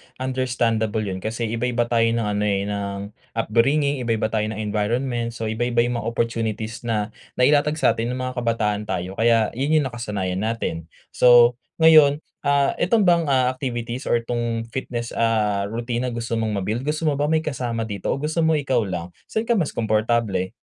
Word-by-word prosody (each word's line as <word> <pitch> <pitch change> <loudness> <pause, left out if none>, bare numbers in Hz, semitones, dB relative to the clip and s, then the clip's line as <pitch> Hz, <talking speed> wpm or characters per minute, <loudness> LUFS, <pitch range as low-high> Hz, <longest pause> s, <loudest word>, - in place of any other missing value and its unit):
understandable 120 -4 -1
yun 95 -2 -4
kasi 110 +3 -4
iba-iba 120 +2 0
tayo 115 -1 +3
ng 115 0 0
ano, 105 0 -1
eh, 100 -1 +1
ng 100 0 -4 0.2
upbringing, 135 +6 +2
iba-iba 115 -2 -1
tayo 110 -1 0
ng 110 - -4
environment 115 +3 -1
so, 115 - -5
iba-iba 120 +2 +1
yung 120 0 -1
mga - - -5
opportunities 115 0 -2
na 105 -1 -1 0.2
nailatag 145 +4 +3
sa 150 - +3
atin 115 +2 -2
nung 130 - -4
mga 130 -1 -3
kabataan 105 -3 -1
tayo, 90 +3 -4
kaya 115 -2 +3
yun 140 +6 0
yung 140 -5 +1
nakasanayan 100 -6 -3
natin. 105 -7 -3 0.2
So, 120 0 +6 0.2
ngayon, 155 -2 +6 0.2
ah, 140 -1 +2
itong 205 +4 +3
bang, 170 -3 +3
ah, 130 -2 +3
activities 125 -2 -4
or 115 -1 +1
'tong 115 -1 -2
fitness, 120 -2 -4
ah, 105 -3 +1
routine 120 +3 -3
na 120 - -4
gusto 115 -1 -2
mong 105 -3 -1
ma-build 110 +5 -1
gusto 155 +2 -1
mo 145 -2 +1
ba 145 - +1
may 160 0 +1
kasama 120 -6 -2
dito 100 -4 -5
o - - +1
gusto 150 +4 -2
mo 160 -1 +3
ikaw 130 -7 0
lang? 90 -1 -5 0.2
Saan 220 - -1
ka 235 - -2
mas 180 -10 0
komportable? 110 -3 0
115 Hz, 185 wpm, -22 LUFS, 110-130 Hz, 0.2 s, So